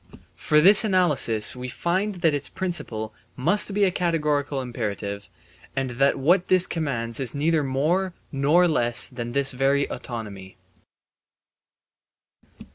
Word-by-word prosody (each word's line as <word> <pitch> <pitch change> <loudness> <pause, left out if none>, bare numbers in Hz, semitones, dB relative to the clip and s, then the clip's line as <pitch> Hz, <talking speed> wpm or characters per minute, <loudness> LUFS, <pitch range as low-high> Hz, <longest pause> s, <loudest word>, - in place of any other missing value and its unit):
For 150 - 0
by - - +6
this 200 +6 +7
analysis 155 - +2
we 125 0 -7
find 185 - -2
that 160 - +4
its 145 -1 -3
principle 115 -12 -4 0.2
must 190 +11 +1
be 205 +1 0
a 190 - +3
categorical 150 -5 -1
imperative 100 -5 -5 0.5
and 135 -2 -2
that 135 +3 +1
what 175 +7 +2
this 185 -1 +4
commands 120 -8 -4
is 130 -2 -4
neither 155 +1 +1
more 165 +8 -1 0.2
nor 150 +6 +3
less 120 -7 +3
than 120 -2 -7
this 140 0 +4
very 135 +2 +1
autonomy. 100 -6 -8
140 Hz, 130 wpm, -23 LUFS, 120-175 Hz, 0.5 s, this